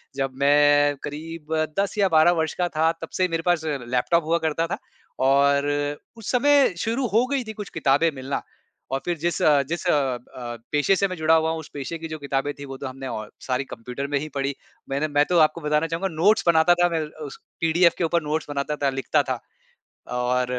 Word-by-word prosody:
जब 135 Hz, -1 st, -2 dB
मैं 145 Hz, 0 st, +5 dB
क़रीब 160 Hz, +1 st, -6 dB, 0.3 s
10 200 Hz, +2 st, -1 dB
या 200 Hz, -2 st, +4 dB
12 160 Hz, +2 st, +5 dB
वर्ष 160 Hz, -, -2 dB
का 175 Hz, -, +2 dB
था 160 Hz, +1 st, +4 dB
तब 165 Hz, -, -6 dB
से 185 Hz, 0 st, +3 dB
मेरे 165 Hz, -1 st, -2 dB
पास 175 Hz, -3 st, +2 dB
लैपटॉप 135 Hz, +3 st, 0 dB
हुआ 165 Hz, +2 st, +2 dB
करता 165 Hz, +2 st, 0 dB
था -, -, -3 dB, 0.5 s
और 140 Hz, +1 st, +4 dB, 0.5 s
उस 220 Hz, -, -5 dB
समय 280 Hz, -2 st, +4 dB
शुरू 235 Hz, +7 st, -1 dB
हो 230 Hz, +3 st, +4 dB
गई 270 Hz, -3 st, 0 dB
थी 220 Hz, -1 st, -7 dB
कुछ 210 Hz, -2 st, -7 dB
किताबें 155 Hz, +1 st, +2 dB
मिलना। 135 Hz, +1 st, -3 dB, 0.5 s
और 135 Hz, -, 0 dB
फिर 175 Hz, -2 st, -1 dB
जिस 170 Hz, +3 st, -1 dB
अ 145 Hz, -2 st, +5 dB
जिस 170 Hz, +2 st, -3 dB
अ -, -, +4 dB
अ, 125 Hz, -3 st, -2 dB
पेशे 150 Hz, +6 st, +3 dB
से 195 Hz, +1 st, +1 dB
मैं 185 Hz, -, -5 dB
जुड़ा 160 Hz, +1 st, +3 dB
हुआ 160 Hz, 0 st, +2 dB
हूँ 160 Hz, -, -3 dB
उस 160 Hz, -, -10 dB
पेशे 145 Hz, +4 st, -5 dB
की 165 Hz, -, -6 dB
जो 155 Hz, -1 st, -6 dB
किताबें 140 Hz, 0 st, -2 dB
थीं 140 Hz, -, -7 dB
वो 135 Hz, -1 st, -8 dB
तो -, -, -2 dB
हमने 135 Hz, +1 st, -8 dB
अ, 110 Hz, -4 st, -5 dB, 0.2 s
सारी 130 Hz, +1 st, 0 dB
कंप्यूटर 125 Hz, +2 st, -6 dB
में 145 Hz, 0 st, 0 dB
ही 155 Hz, +2 st, -6 dB
पढ़ी। 140 Hz, 0 st, -1 dB, 0.3 s
मैंने 140 Hz, +3 st, 0 dB
मैं 145 Hz, 0 st, +2 dB
तो 180 Hz, -, +3 dB
आपको 170 Hz, -, -11 dB
बताना 150 Hz, +2 st, +1 dB
चाहूँगा 165 Hz, +4 st, -2 dB
नोट्स 200 Hz, +5 st, +3 dB
बनाता 165 Hz, +1 st, +5 dB
था, 175 Hz, 0 st, +2 dB
मैं 165 Hz, -1 st, -1 dB, 0.2 s
उस 140 Hz, -, -9 dB, 0.2 s
पीडीएफ 170 Hz, +1 st, +4 dB
के -, -, -1 dB
ऊपर 170 Hz, 0 st, +1 dB
नोट्स 150 Hz, +1 st, -2 dB
बनाता 145 Hz, +1 st, -2 dB
था, 140 Hz, -2 st, 0 dB
लिखता 135 Hz, +2 st, +1 dB
था। 130 Hz, -3 st, -3 dB, 0.7 s
और 125 Hz, +1 st, +1 dB
155 Hz, 220 wpm, -24 LUFS, 140-170 Hz, 0.7 s, मैं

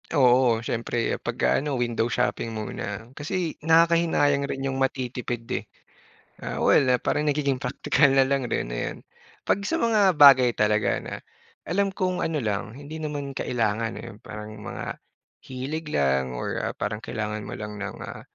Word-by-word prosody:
Oo, 125 Hz, -5 st, +4 dB
siyempre 115 Hz, 0 st, -1 dB
pag, -, -, -4 dB
ah, 65 Hz, -, +4 dB
ano 145 Hz, -2 st, -2 dB
window 120 Hz, -1 st, 0 dB
shopping 125 Hz, -1 st, -1 dB
muna, 110 Hz, 0 st, -5 dB
kasi 165 Hz, +4 st, -3 dB
nakakahinayang 160 Hz, -3 st, +4 dB
rin 135 Hz, 0 st, -3 dB
'yong 135 Hz, 0 st, -2 dB
matitipid, 125 Hz, -2 st, -2 dB
eh. -, -, -2 dB, 0.7 s
Ah, -, -, -5 dB
well, 140 Hz, -, +5 dB
ah, 125 Hz, -, +1 dB
parang 150 Hz, -, 0 dB
nagiging 140 Hz, -2 st, +1 dB
praktikal 135 Hz, +2 st, +2 dB
na 135 Hz, -, +6 dB
lang 135 Hz, -1 st, 0 dB
rin, 115 Hz, -, -2 dB
ayan. -, -, -3 dB, 0.5 s
Pag 200 Hz, +1 st, 0 dB
sa 330 Hz, +9 st, 0 dB
mga 210 Hz, -5 st, +4 dB
bagay 130 Hz, -4 st, +8 dB
talaga 105 Hz, 0 st, +1 dB
na, -, -, -7 dB, 0.5 s
alam 195 Hz, +4 st, +1 dB
kong 185 Hz, -1 st, -1 dB
ano 160 Hz, -1 st, -1 dB
lang 110 Hz, 0 st, -3 dB
hindi 150 Hz, +3 st, -8 dB
naman 145 Hz, -2 st, -4 dB
kailangan, 115 Hz, -3 st, -1 dB
eh, 120 Hz, -, -8 dB
parang 105 Hz, 0 st, -8 dB
mga, -, -, -6 dB, 0.5 s
hilig 145 Hz, +5 st, -5 dB
lang 65 Hz, -2 st, +1 dB
or, -, -, -3 dB
ah, -, -, -2 dB
parang 105 Hz, 0 st, -2 dB
kailangan 105 Hz, -1 st, -4 dB
mo -, -, -6 dB
lang 105 Hz, -1 st, -6 dB
ng, -, -, -5 dB
ah -, -, -8 dB
130 Hz, 165 wpm, -25 LUFS, 115-150 Hz, 0.7 s, bagay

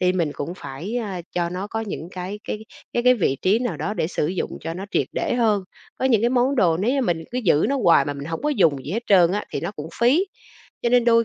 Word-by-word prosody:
thì 180 Hz, 0 st, +3 dB
mình 165 Hz, -5 st, 0 dB
cũng 150 Hz, +5 st, -5 dB
phải, 185 Hz, -, -6 dB
à, 200 Hz, -7 st, -3 dB
cho 175 Hz, -1 st, 0 dB
nó 185 Hz, +3 st, -4 dB
có 225 Hz, +1 st, -3 dB
những 190 Hz, -6 st, -5 dB
cái 185 Hz, +3 st, -5 dB
cái 210 Hz, -, -3 dB, 0.3 s
cái 240 Hz, -, 0 dB
cái 250 Hz, +1 st, +6 dB
vị 165 Hz, -, +1 dB
trí 200 Hz, +5 st, +4 dB
nào 245 Hz, -3 st, -2 dB
đó 210 Hz, -, -3 dB
để 160 Hz, -, 0 dB
sử 160 Hz, -3 st, -1 dB
dụng 180 Hz, +3 st, -3 dB
cho 165 Hz, -, -4 dB
nó 190 Hz, +2 st, -5 dB
triệt -, -, +1 dB
để -, -, -1 dB
hơn. 215 Hz, -5 st, +2 dB, 0.4 s
Có -, -, -2 dB
những 235 Hz, -5 st, +4 dB
cái 235 Hz, -, +2 dB
món 255 Hz, +2 st, +2 dB
đồ 175 Hz, -8 st, +4 dB
nếu 200 Hz, +8 st, +1 dB
như 275 Hz, +1 st, +1 dB
mình 165 Hz, -7 st, -1 dB
cứ 245 Hz, -, -2 dB
giữ 180 Hz, -9 st, +3 dB
nó 280 Hz, -, +1 dB
hoài 170 Hz, -, +6 dB
mà 145 Hz, -, -2 dB
mình 140 Hz, 0 st, -7 dB
hổng 165 Hz, +1 st, -4 dB
có 300 Hz, -, +1 dB
dùng 160 Hz, -, +2 dB
gì 145 Hz, -, -5 dB
hết 230 Hz, +4 st, -1 dB
trơn 180 Hz, -3 st, +5 dB
á, 210 Hz, -, -1 dB
thì -, -, -3 dB
nó 170 Hz, -, -3 dB
cũng 155 Hz, -4 st, -7 dB
phí. 275 Hz, +11 st, +4 dB, 0.6 s
Cho 235 Hz, -, +2 dB
nên 245 Hz, 0 st, +4 dB
đôi 230 Hz, -1 st, +5 dB
195 Hz, 285 wpm, -23 LUFS, 170-240 Hz, 0.6 s, cái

